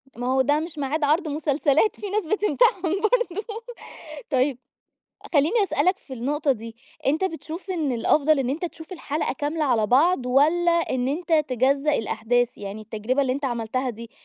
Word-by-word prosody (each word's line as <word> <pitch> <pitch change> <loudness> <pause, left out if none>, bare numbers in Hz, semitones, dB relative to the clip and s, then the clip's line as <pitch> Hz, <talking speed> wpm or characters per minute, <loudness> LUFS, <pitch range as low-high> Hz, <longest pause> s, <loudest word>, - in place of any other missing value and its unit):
ما 245 +1 -4
هو 265 +1 +3
ده 290 +3 +2
مش 325 0 -7
ميعاد 290 +2 -2
عرض 310 +4 +2
مسلسلات، 300 +4 +1
في 410 - -5
ناس 405 -3 -1
بتمتحن 420 +2 +2 0.2
برضه. 435 -3 0 0.9
طيب، 260 -1 +1 0.7
خليني 335 +9 +3
أسألك 370 -1 +1
في 265 - -14
النقطة 280 +4 0
دي، 230 -1 -9 0.3
أنت 310 +7 +2
بتشوف 330 +1 -5
إن 315 -8 -1
الأفضل 290 +6 +3
إن 260 -2 0
أنت 310 +6 -3
تشوف 330 +1 -8
الحلقة 310 -3 -2
كاملة 295 +4 -2
على 235 -6 +2
بعض 270 - +3
والّا 310 +7 +3
إن 260 -7 0
أنت 335 +4 -3 0.2
تجزأ 275 +4 +2
الأحداث؟ 235 +1 0
يعني 200 +1 -6
التجربة 225 +6 -1
اللي 255 - 0
أنت 280 +2 -4
عملتها 250 +1 -2
دي، 230 0 -10
290 Hz, 165 wpm, -24 LUFS, 255-335 Hz, 0.9 s, هو